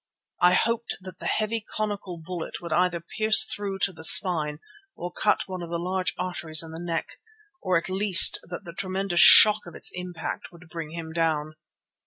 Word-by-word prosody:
I 180 Hz, +1 st, +4 dB
hoped 230 Hz, +3 st, -2 dB
that 185 Hz, -1 st, -12 dB
the -, -, -7 dB
heavy 220 Hz, +1 st, -3 dB
conical 205 Hz, -4 st, -6 dB
bullet 170 Hz, 0 st, -8 dB
would 170 Hz, -2 st, -7 dB
either 175 Hz, 0 st, 0 dB
pierce 215 Hz, +6 st, +4 dB
through 200 Hz, -2 st, -4 dB
to 195 Hz, -, 0 dB
the 160 Hz, -, -12 dB
spine 160 Hz, -4 st, +4 dB, 0.4 s
or 175 Hz, -, -8 dB
cut 210 Hz, -, -1 dB
one 185 Hz, -1 st, -8 dB
of 170 Hz, -, -9 dB
the 170 Hz, -, -4 dB
large 185 Hz, +2 st, -4 dB
arteries 160 Hz, -3 st, 0 dB
in 160 Hz, -, -11 dB
the 160 Hz, -, -10 dB
neck, 170 Hz, -1 st, -6 dB, 0.4 s
or 185 Hz, -2 st, 0 dB
at 165 Hz, -, -5 dB
least 190 Hz, 0 st, +5 dB
that 180 Hz, -, -8 dB
the 170 Hz, -3 st, -11 dB
tremendous 190 Hz, -1 st, -4 dB
shock 210 Hz, -2 st, +7 dB
of 175 Hz, -, -12 dB
its -, -, -2 dB
impact 180 Hz, -2 st, -8 dB
would 175 Hz, 0 st, -18 dB
bring 165 Hz, -2 st, -8 dB
him 160 Hz, 0 st, -9 dB
down. 155 Hz, -2 st, -2 dB
180 Hz, 190 wpm, -24 LUFS, 165-195 Hz, 0.4 s, shock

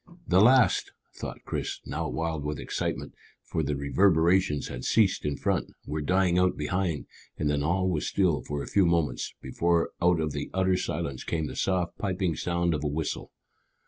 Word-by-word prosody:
"The 90 Hz, +1 st, +5 dB
last!" 125 Hz, +2 st, +4 dB, 0.2 s
thought -, -, -7 dB
Chris, -, -, -3 dB
now -, -, -3 dB
wild 80 Hz, -2 st, -2 dB
with 75 Hz, +1 st, -3 dB
excitement, -, -, -3 dB, 0.3 s
for 80 Hz, -, -2 dB
the 75 Hz, -1 st, -1 dB
reverberations 80 Hz, +2 st, +3 dB
had 60 Hz, 0 st, -6 dB
ceased 105 Hz, -8 st, +2 dB
in 75 Hz, -1 st, -1 dB
front, -, -, -1 dB
were 75 Hz, +2 st, -3 dB
dying 90 Hz, +2 st, +2 dB
out 90 Hz, 0 st, +2 dB
behind, 85 Hz, +1 st, -1 dB, 0.3 s
and 75 Hz, -1 st, 0 dB
then 70 Hz, -1 st, 0 dB
all 90 Hz, +5 st, +1 dB
was 85 Hz, -5 st, -1 dB
still 90 Hz, -7 st, +2 dB
for 75 Hz, -1 st, -4 dB
a -, -, -8 dB
few 100 Hz, -3 st, +3 dB
moments, 85 Hz, -3 st, 0 dB
before 85 Hz, +5 st, +1 dB
out 90 Hz, -1 st, +4 dB
of 75 Hz, -1 st, -1 dB
the -, -, -4 dB
utter 95 Hz, -1 st, +3 dB
silence 70 Hz, -7 st, -3 dB
came 80 Hz, -2 st, -2 dB
the 65 Hz, -3 st, -6 dB
soft 90 Hz, +1 st, -1 dB
piping 95 Hz, -4 st, -1 dB
sound 85 Hz, +1 st, 0 dB
of 75 Hz, -1 st, -2 dB
a -, -, 0 dB
whistle. 75 Hz, +2 st, -3 dB
85 Hz, 180 wpm, -28 LUFS, 75-95 Hz, 0.3 s, The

